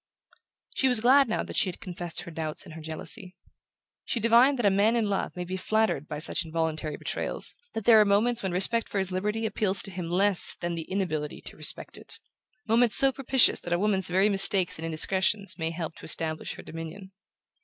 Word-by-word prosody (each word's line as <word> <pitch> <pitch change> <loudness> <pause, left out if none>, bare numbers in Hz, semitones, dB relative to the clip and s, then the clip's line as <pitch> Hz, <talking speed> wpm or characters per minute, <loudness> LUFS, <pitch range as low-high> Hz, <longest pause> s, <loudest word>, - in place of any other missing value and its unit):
She 265 - +1
was 250 -3 +3
glad 265 +2 +4
now 220 - -2
that - - -9
she 190 - +2
had 175 - -8
confessed 175 -2 -6
her 170 - -10
doubts 155 -1 -5
and 160 - -12
her 160 - -10
jealousy. 180 +5 -3 0.7
She 235 - -2
divined 235 +5 +4
that 240 - -2
a 200 - +4
man 205 +4 +2
in 230 -3 0
love 200 -2 -3
may 180 - -5
be 185 +2 -6
flattered 185 -7 -1
by 150 - -6
such 155 +3 0
involuntary 160 -2 -4
betrayals, - - -3 0.2
that 225 -2 -6
there 220 -2 +6
are - - +3
moments 215 +4 +2
when 190 - -3
respect 205 +6 +1
for - - -5
his 190 -1 -1
liberty 210 +4 -3
appeals 200 -3 +2
to 195 - -6
him 180 -2 -6
less 195 +2 +5
than 175 0 -5
the 165 -1 -7
inability 155 -6 -3
to - - -9
respect - - 0
it: - - -10 0.5
moments 230 +1 +3
so 270 0 +8
propitious 265 -1 +2
that 175 - -5
a - - +1
woman's 190 -2 +1
very 190 +3 +2
mistakes 195 -3 +3
and 165 - -5
indiscretions 190 +5 -1
may 160 0 -2
help 165 -1 -6
to - - -12
establish 160 0 -2
her - - -12
dominion. 165 +4 -9
190 Hz, 210 wpm, -26 LUFS, 165-220 Hz, 0.7 s, so